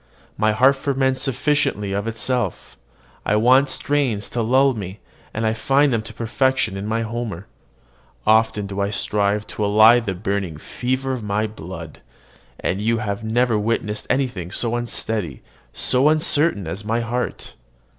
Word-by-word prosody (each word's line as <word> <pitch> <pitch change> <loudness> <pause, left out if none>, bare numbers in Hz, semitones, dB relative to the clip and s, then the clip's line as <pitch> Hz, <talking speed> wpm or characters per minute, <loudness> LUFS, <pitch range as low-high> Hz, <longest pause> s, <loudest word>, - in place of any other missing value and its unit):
My 110 0 +2
heart 130 +5 +4
ferments 135 -1 0
sufficiently 135 -6 0
of 100 +2 -2
itself. 120 +3 -2 0.5
I 105 - +1
want 130 +5 +5
strains 130 -6 -1
to 120 - -1
lull 130 +4 +4
me, 100 -3 -7 0.3
and 110 +1 -2
I 110 - +2
find 135 +4 +2
them 115 - +1
to 110 +1 -9
perfection 120 -2 0
in 100 +1 -4
my 115 +1 0
Homer. 110 -5 -4 0.8
Often 110 -1 +3
do 100 0 -5
I 100 - 0
strive 105 0 0
to 105 - -4
allay 110 +4 +6
the 100 -5 -3
burning 100 -4 -2
fever 130 - -2
of 125 - -4
my 105 +1 0
blood; 85 -6 -8 0.6
and 95 - -1
you 115 +2 +1
have 100 -1 -3
never 115 0 +1
witnessed 105 -1 -2
anything 125 -10 -1
so 115 +4 -1
unsteady, 110 - -3 0.3
so 130 +4 +3
uncertain, 155 - +2
as 95 +6 -5
my 115 +3 0
heart. 120 +2 -4
110 Hz, 155 wpm, -21 LUFS, 105-125 Hz, 0.8 s, allay